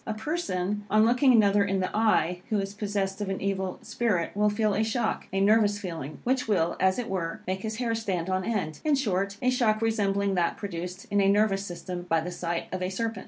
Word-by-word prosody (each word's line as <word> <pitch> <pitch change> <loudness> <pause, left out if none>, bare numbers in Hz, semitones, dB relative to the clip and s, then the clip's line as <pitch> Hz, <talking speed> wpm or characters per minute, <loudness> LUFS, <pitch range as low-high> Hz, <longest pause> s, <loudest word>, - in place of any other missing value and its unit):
A 220 - -2
person, 210 - -2
on 215 +2 +5
looking 250 +3 +4
another 205 -3 +5
in 195 -1 0
the 185 - -2
eye, 195 -5 +2
who 215 - +1
is 195 0 -3
possessed 200 -1 -2
of 205 - -2
an 195 - -2
evil 190 -2 -2
spirit, 205 -9 -1
will 210 +1 +3
feel 210 0 +1
a 215 - +1
shock 220 0 -1
a 195 - 0
nervous 205 0 +4
feeling, 165 -7 -6
which 255 0 0
will, 170 -5 +1
as 190 0 +3
it 245 - -3
were, 170 -4 -3
make 190 +1 -2
his 220 +1 -3
hair 230 0 -1
stand 190 -7 -2
on 185 0 0
end; 185 -8 -2
in 305 -2 +3
short, 200 -6 -1
a 255 - +3
shock 225 -4 +2
resembling 200 -3 +1
that 175 -2 0
produced 180 -1 -6
in 205 0 +3
a 195 - +4
nervous 200 -1 +2
system 180 -1 -6
by 165 - +3
the 175 +3 -4
sight 170 -1 -3
of 185 - -3
a 185 - -1
serpent. 225 +2 -3
200 Hz, 225 wpm, -27 LUFS, 185-220 Hz, -, on